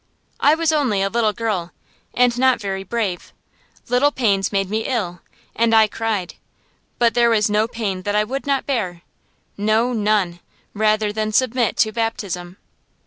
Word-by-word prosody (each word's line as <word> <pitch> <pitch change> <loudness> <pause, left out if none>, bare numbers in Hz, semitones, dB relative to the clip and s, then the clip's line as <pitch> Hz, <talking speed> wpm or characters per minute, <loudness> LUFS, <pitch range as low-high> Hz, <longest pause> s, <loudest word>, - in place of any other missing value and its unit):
I 295 +2 +5
was 325 0 +1
only 255 -11 +1
a 195 - 0
little 230 -2 +2
girl, 210 -6 -3 0.4
and 245 -1 +3
not 260 0 +3
very 195 -2 -4
brave; 195 -3 -3 0.6
little 255 +4 +3
pains 200 -8 +1
made 195 -2 0
me 220 +3 -2
ill, 190 -9 -2 0.3
and 225 0 +3
I 220 0 +7
cried. 210 -4 -3 0.6
But 235 -1 +3
there 235 -1 +4
was 215 -2 +2
no 210 +1 +2
pain 210 -6 -3
that 205 +2 -2
I 210 - +3
would 270 +6 -5
not 275 -1 0
bear 185 -11 -2 0.5
no, 220 +4 +1
none 205 -5 0 0.3
rather 215 0 +1
than 215 0 -2
submit 245 -1 +1
to 220 - +2
baptism. 200 -6 -4
215 Hz, 160 wpm, -20 LUFS, 200-235 Hz, 0.6 s, I